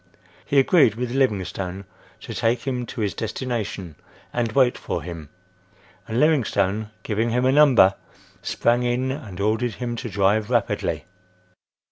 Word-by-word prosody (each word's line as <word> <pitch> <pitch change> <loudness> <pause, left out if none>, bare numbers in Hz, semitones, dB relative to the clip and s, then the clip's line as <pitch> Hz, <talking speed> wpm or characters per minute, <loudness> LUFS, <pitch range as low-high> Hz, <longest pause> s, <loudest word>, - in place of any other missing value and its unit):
He 140 - -1
agreed 135 - +5
with 120 +1 -3
Livingstone 100 -7 -1 0.4
to - - -7
take 115 +1 +1
him 125 -3 -2
to 120 - -5
his 105 -2 0
destination 110 - -4 0.4
and 120 -2 0
wait 130 -3 +4
for - - -4
him, 85 -4 -8 0.8
and 115 +2 -1
Livingstone, 110 -9 +1
giving 110 +2 0
him 125 +2 +1
a 130 - +4
number, 135 -9 +6 0.5
sprang 120 +1 +1
in 125 +2 0
and 115 -10 -7
ordered 110 +2 0
him 120 -1 -4
to 120 0 -5
drive 105 +1 +1
rapidly. - - 0
115 Hz, 140 wpm, -23 LUFS, 100-125 Hz, 0.8 s, number